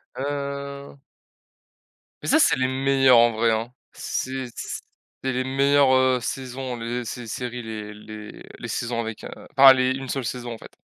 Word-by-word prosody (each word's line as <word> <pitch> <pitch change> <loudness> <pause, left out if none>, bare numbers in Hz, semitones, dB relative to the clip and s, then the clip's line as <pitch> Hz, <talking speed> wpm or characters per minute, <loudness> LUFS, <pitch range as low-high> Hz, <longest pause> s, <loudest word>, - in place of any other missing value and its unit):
Heu 140 0 -5 1.2
mais - - -5
ça, - - +5
c'est - - +4
les 130 0 +1
meilleures, 135 -1 +4
en 120 0 +6
vrai 115 +1 +2
hein, 115 +2 -1 0.2
c'est 130 0 -3
c 120 - -6 0.4
c'est 130 0 -1
les 130 +1 0
meilleures, 135 +1 +3
heu, 130 -1 +4
saisons, 130 -1 -4
les 120 +1 -3
ces 120 0 -6
séries, 125 +2 -4
les 105 -1 -6
les 105 0 -10 0.2
les - - -7
saisons 120 -1 -2
avec, 110 -2 -6
heu, - - -7 0.3
pas 135 -1 +10
les 130 0 +2
1 135 0 -4
seule 135 0 -2
saison, 120 0 -4
en - - -8
fait. - - -13
130 Hz, 175 wpm, -24 LUFS, 115-135 Hz, 1.2 s, pas